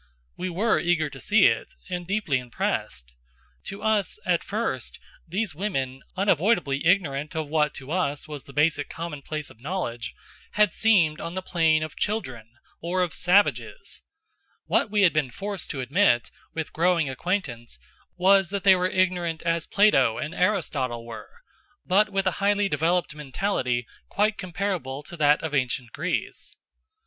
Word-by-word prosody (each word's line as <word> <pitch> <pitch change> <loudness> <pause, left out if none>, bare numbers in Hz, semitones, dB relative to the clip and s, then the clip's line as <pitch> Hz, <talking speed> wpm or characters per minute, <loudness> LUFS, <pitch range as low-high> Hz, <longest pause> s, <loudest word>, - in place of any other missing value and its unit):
We 185 - -3
were 210 +6 +2
eager 165 -4 +1
to 135 - -10
see 205 +4 +4
it, - - +1
and 180 -2 -4
deeply 195 -9 0
impressed. 70 - -3 0.5
To 195 +1 -7
us, 220 - +1
at - - +1
first, - - -3 0.3
these 190 +3 -2
women, 135 -7 -3 0.2
unavoidably 175 -6 +2
ignorant 155 -6 +1
of 160 -2 -2
what 150 0 +1
to 135 +2 -9
us 145 -5 -1
was 150 -3 -8
the - - -12
basic 150 0 +1
commonplace 155 -2 -5
of 110 - -19
knowledge, 135 -7 -4 0.4
had 210 0 +3
seemed 175 -9 +3
on 170 - -5
the 185 - -3
plane 160 -3 +2
of 155 - -6
children, 130 - -3 0.3
or 180 +2 0
of 175 - -3
savages. 200 - +1 0.6
What - - +1
we 205 -1 +2
had 170 -6 +5
been 155 -4 +1
forced 200 +5 -5
to 135 - -3
admit, 130 - +2 0.2
with 160 -2 -5
growing 170 -2 +2
acquaintance, 130 - -3 0.4
was 190 0 +4
that 200 0 -3
they 195 -1 +7
were 180 0 +1
ignorant 180 -3 0
as 170 -1 0
Plato 135 - +4
and 155 +2 -4
Aristotle 135 - 0
were, 115 -1 -9 0.6
but 205 +3 +3
with 195 -1 -1
a 185 - +3
highly 205 0 +3
developed 165 0 +1
mentality 135 - -1 0.2
quite 210 +2 +1
comparable 180 -8 -3
to 175 - -10
that 150 0 +3
of 160 -2 -3
Ancient 125 -3 -1
Greece. 165 +9 -3
170 Hz, 155 wpm, -25 LUFS, 140-195 Hz, 0.6 s, they